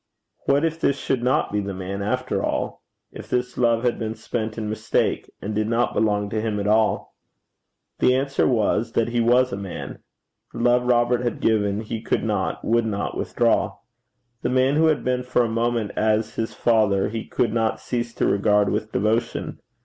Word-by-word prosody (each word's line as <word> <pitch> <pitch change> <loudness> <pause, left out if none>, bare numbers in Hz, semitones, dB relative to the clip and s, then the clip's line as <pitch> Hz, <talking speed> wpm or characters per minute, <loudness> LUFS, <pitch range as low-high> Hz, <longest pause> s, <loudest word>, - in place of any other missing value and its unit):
What 140 +3 +3
if 165 0 -2
this 140 - +1
should 135 -2 -1
not 125 +2 +1
be 105 - 0
the 100 -1 -4
man 95 +1 -5
after 125 +6 -1
all? - - -2 0.3
if - - -10
this 125 0 -1
love 115 -1 +2
had 120 -1 0
been 110 0 -3
spent 110 0 -4
in 110 -2 -3
mistake, 110 0 -1
and 105 +2 -3
did 105 +1 0
not 120 +1 +1
belong 105 -2 +1
to 110 - -1
him 110 -2 -1
at 100 - -2
all? 110 +1 +1 0.8
The 125 - +4
answer 135 +1 +1
was, 115 -1 +1
that 115 0 +1
he 120 0 0
was 125 +2 +3
a - - -2
man. 100 -2 -7 0.5
The - - -6
love 125 +1 +3
Robert 120 0 +3
had 120 -3 -2
given 105 -2 +1
he 110 0 -5
could 115 - -1
not, 105 -4 -2
would 115 0 +2
not 100 -2 -3
withdraw. - - +1 0.6
The - - -1
man 130 +2 +3
who 160 +1 +4
had 150 -7 +1
been 125 0 0
for 125 -1 +1
a - - 0
moment 115 -1 -1
as 110 0 +1
his 115 - -3
father 105 -4 +2
he 110 0 -4
could 115 -3 0
not 115 -1 0
cease 120 -1 -3
to - - 0
regard 105 0 +3
with 110 +1 -2
devotion. 110 +4 -1
115 Hz, 195 wpm, -23 LUFS, 105-125 Hz, 0.8 s, The